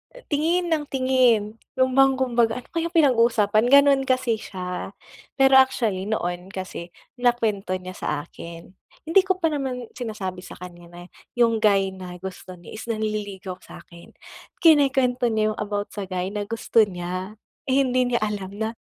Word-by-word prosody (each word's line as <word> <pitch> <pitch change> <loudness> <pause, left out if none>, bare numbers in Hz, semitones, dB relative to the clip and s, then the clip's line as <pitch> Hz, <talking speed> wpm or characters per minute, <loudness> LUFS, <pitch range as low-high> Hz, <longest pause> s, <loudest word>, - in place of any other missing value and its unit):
uh - - -13
tingin 335 +4 +1
ng 300 -2 +1
tingin. 250 -5 +2 0.2
Yun 260 0 +2
bang 270 0 +4
kumbaga, 240 -3 +1
ano 250 - -16
kayang 335 +1 -3
pinag-uusapan, 230 -6 +3
ganun 280 0 +6
kasi 255 -4 +1
siya. 180 -3 -6 0.4
Pero 270 -1 +6
actually 220 -7 +1
noon 180 -4 -3
kasi 185 -3 -7 0.3
nakwento 220 -6 0
niya 185 0 -7
sa - - -5 0.2
akin. 170 +1 -11 0.3
Hindi 330 +5 +4
ko 375 - +2
pa 325 -1 +2
naman 255 -4 -4
sinasabi 210 -7 -5
sa 180 - -10
kanya 175 -1 -11
na 175 +1 -12 0.3
yung 230 -2 +3
guy 195 -3 +3
na 185 -1 -9
gusto 185 0 -8
niya 175 - -14
is - - -8
nanililigaw 205 -4 -4
sa'kin. 170 0 -14 0.5
Kinukwento 265 -6 +4
niya 215 -1 +1
yung - - -15
about 205 -1 -3
sa 205 - -4
guy 185 0 -2
na 205 -1 -2
gusto 230 0 +2
niya, 185 +2 -5 0.4
eh, 260 - +2
hindi 255 0 +1
niya 240 - +1
alam 205 -3 -3
na 220 0 -1
220 Hz, 165 wpm, -23 LUFS, 190-260 Hz, 0.5 s, ganun